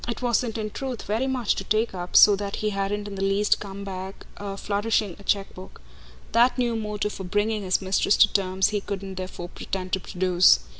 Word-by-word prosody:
It 235 +1 -4
wasn't 235 -1 0
in 215 -1 -3
truth 260 -2 -5
very 225 +6 -1
much 255 -4 +1
to - - -3
take 215 +3 0
up, 180 -1 -6
so 205 -1 +9
that 200 0 -4
he 215 0 -1
hadn't 200 +1 -2
in 205 - -7
the 195 - -5
least 195 +2 +2
come 200 -1 -7
back 190 0 -7 0.3
flourishing 205 -2 0
a - - -13
chequebook; 195 -2 -3 0.5
that 240 +4 +4
new 240 -2 +1
motive 210 -1 -3
for 190 - -7
bringing 205 +3 0
his 185 0 0
mistress 190 +2 +2
to - - +5
terms 190 0 +2
he 210 -1 -1
couldn't 195 -1 -5
therefore 185 -1 -6
pretend 185 0 -5
to 190 - +2
produce. 180 - +4
200 Hz, 200 wpm, -25 LUFS, 190-215 Hz, 0.5 s, so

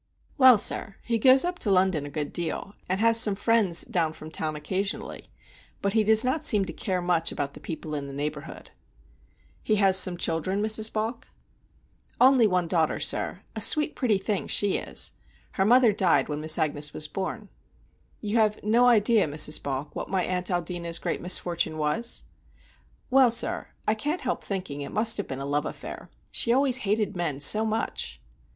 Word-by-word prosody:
"Well, 260 -4 +7
sir, 205 0 +2
he 230 -1 -1
goes 260 +6 +5
up 355 0 -4
to 210 - +1
London 185 -6 +1
a - - -8
good 145 0 -5
deal, 175 +3 -3 0.2
and 185 +1 -1
has 230 +1 +4
some 210 -3 +5
friends 205 -5 +1
down 165 -3 -1
from 155 0 -11
town 155 -1 -3
occasionally; 190 +7 -4 0.5
but 200 0 -2
he 220 -1 +2
does 220 +2 +4
not 280 +5 -1
seem 210 -10 +4
to - - -7
care 185 -2 -3
much 170 -2 +1
about 140 -1 -4
the - - -12
people 160 -1 -7
in 145 -2 -4
the - - -8
neighborhood." 145 +2 -7 0.9
"He 215 - 0
has 195 -2 +3
some 180 -2 +4
children, 170 +4 -2
Mrs. 220 +1 +2
Balk?" 225 +2 -4 0.9
"Only 255 -3 +5
one 180 -3 0
daughter, 165 -2 0
sir; - - 0
a - - -5
sweet 300 0 +3
pretty 230 -7 +1
thing 200 0 -3
she 205 -2 +1
is. - - -2 0.4
Her 190 - -1
mother 240 +1 +5
died 170 -9 +1
when 150 0 -4
Miss 155 0 +3
Agnes 150 -1 -1
was 155 - -2
born." 195 +4 -6 0.7
"You 210 +1 -2
have 215 -1 +1
no 235 +4 +3
idea, 220 -4 +3
Mrs. 150 +1 0
Balk, 140 +1 -5
what - - -6
my 190 -2 0
aunt 180 0 -2
Aldina's 175 -1 -3
great - - -4
misfortune 170 -2 0
was?" 155 +11 -1 0.9
"Well, 265 -1 +5
sir, 235 0 0 0.2
I 215 - +3
can't 295 +10 -3
help - - -3
thinking 180 -8 -5
it 140 - -7
must 225 +1 +2
have 205 - -4
been 130 - -6
a 135 - -5
love 145 +1 -1
affair. - - -9 0.2
She 235 - +3
always 260 0 +2
hated 210 -1 -1
men 165 -6 -3
so 215 +10 +4
much." 220 +1 -4
195 Hz, 185 wpm, -25 LUFS, 160-225 Hz, 0.9 s, Well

